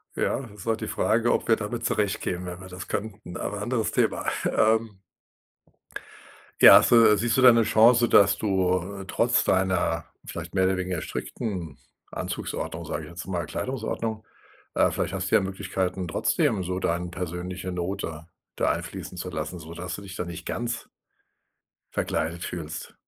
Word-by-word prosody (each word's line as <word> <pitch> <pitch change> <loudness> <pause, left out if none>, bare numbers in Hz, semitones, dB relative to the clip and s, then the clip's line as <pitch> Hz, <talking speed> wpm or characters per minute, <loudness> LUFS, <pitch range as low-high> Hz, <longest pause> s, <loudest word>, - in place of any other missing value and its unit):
Ja, 135 - -1
ist 105 +1 -11
halt 115 0 0
die 110 - -3
Frage, 115 +2 +2
ob - - -1
wir 115 - +5
damit 110 +2 -4
zurechtkämen, 95 -3 -1
wenn 90 0 -6
wir 95 - -9
das 90 0 -8
könnten. 105 -4 -5
Aber 105 0 -4
anderes 115 0 -1
Thema, - - +1 0.2
ähm 110 -2 +2 1.6
Ja. - - +11
Hast - - +3
du 110 -3 +7
siehst 120 +4 +1
du - - +4
da 125 - +10
'ne 115 -1 +4
Chance, 115 +2 +5
dass 100 -1 +6
du, 95 -1 0
äh, 95 - -8
trotz - - +2
deiner 95 -3 +1 0.2
vielleicht 85 0 -7
mehr 95 -1 +3
oder 95 0 +2
weniger 90 -3 -2
strickten 90 - -5 0.3
Anzugsordnung, - - -4
sage 75 - -4
ich - - -11
jetzt 85 +2 -8
mal, 90 -4 -2
Kleidungsordnung. 110 - -3 0.5
Äh, - - +4
vielleicht - - -2
hast 95 -1 -3
du - - +5
ja - - +5
Möglichkeiten, 95 -1 -2
trotzdem 95 +4 +1
so 90 +1 -2
dein 85 0 -1
persönliche 90 +1 -5
Note 85 -3 -4 0.3
da - - +2
einfließen 90 - -6
zu 90 +1 -4
lassen, 80 +1 -4
sodass 85 +3 -6
du - - -9
dich 95 -1 -9
da 90 - -3
nicht 85 0 -8
ganz 120 0 -3 1.1
verkleidet 85 +2 -1
fühlst. 80 -3 -6
95 Hz, 165 wpm, -26 LUFS, 90-110 Hz, 1.6 s, Ja